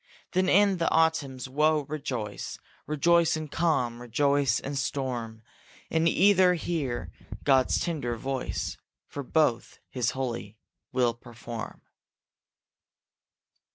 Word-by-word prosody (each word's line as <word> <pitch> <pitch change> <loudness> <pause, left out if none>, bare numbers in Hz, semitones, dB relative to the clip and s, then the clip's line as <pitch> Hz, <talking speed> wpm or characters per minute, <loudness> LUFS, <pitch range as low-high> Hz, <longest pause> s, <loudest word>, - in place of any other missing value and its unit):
Then 185 0 +2
in 200 0 +4
the 170 - +1
autumn's 155 -6 +1
woe 150 +2 +2
rejoice, 125 -9 -4 0.3
Rejoice 165 +2 +3
in 155 -1 -6
calm, 130 -8 0
rejoice 140 0 +2
in 140 - -5
storm; 120 -5 -3 0.5
In 165 0 +2
either 185 0 +5
hear 130 - -3 0.3
God's 135 -2 +3
tender 145 -9 -2
voice, 135 +2 -3 0.3
For 145 - -6
both 135 -3 0
his 125 -3 0
holy 115 -5 -4 0.3
will 125 -2 +2
perform. 120 -1 -8
140 Hz, 105 wpm, -28 LUFS, 120-160 Hz, 0.5 s, either